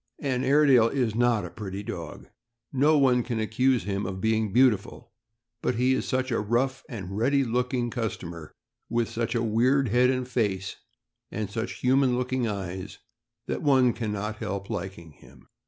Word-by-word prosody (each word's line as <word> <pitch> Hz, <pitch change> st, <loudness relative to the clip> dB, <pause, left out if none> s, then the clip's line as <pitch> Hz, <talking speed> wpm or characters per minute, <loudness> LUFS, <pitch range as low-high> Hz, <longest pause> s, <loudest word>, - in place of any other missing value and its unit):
An 130 Hz, -3 st, -1 dB
Airedale 135 Hz, -4 st, +5 dB
is 120 Hz, -3 st, 0 dB
not 120 Hz, -1 st, +2 dB
a -, -, -8 dB
pretty 100 Hz, -1 st, -6 dB
dog -, -, -7 dB, 0.2 s
— 115 Hz, +2 st, -42 dB
no 155 Hz, +1 st, +5 dB
one 130 Hz, -3 st, +4 dB
can 120 Hz, -1 st, -3 dB
accuse 125 Hz, +4 st, +1 dB
him 100 Hz, -1 st, -2 dB
of 95 Hz, 0 st, -5 dB
being 110 Hz, 0 st, +1 dB
beautiful; 120 Hz, -5 st, +2 dB, 0.5 s
but 125 Hz, -, 0 dB
he 125 Hz, +3 st, +2 dB
is 130 Hz, -, -1 dB
such 130 Hz, 0 st, -1 dB
a 115 Hz, -, +1 dB
rough 120 Hz, +5 st, 0 dB
and 95 Hz, -5 st, -6 dB
ready 135 Hz, +6 st, +2 dB
look 125 Hz, +1 st, -1 dB
ing 120 Hz, -2 st, -1 dB
customer, 85 Hz, -, -5 dB, 0.4 s
with 120 Hz, -1 st, 0 dB
such 115 Hz, +1 st, -2 dB
a 115 Hz, -, +1 dB
weird 125 Hz, +4 st, +2 dB
head 125 Hz, +3 st, +4 dB
and 130 Hz, -1 st, -1 dB
face, 100 Hz, -6 st, -1 dB, 0.6 s
and 105 Hz, -2 st, -4 dB
such 115 Hz, +2 st, -3 dB
human 130 Hz, -1 st, +3 dB
looking 125 Hz, -1 st, -1 dB
eyes, 95 Hz, -1 st, -5 dB, 0.5 s
that -, -, -3 dB
one 130 Hz, -5 st, +4 dB
can 110 Hz, -2 st, -3 dB
not 105 Hz, +1 st, -4 dB
help 100 Hz, -1 st, -5 dB
liking 90 Hz, -3 st, -6 dB
him. 65 Hz, -2 st, -19 dB
115 Hz, 175 wpm, -26 LUFS, 105-130 Hz, 0.6 s, Airedale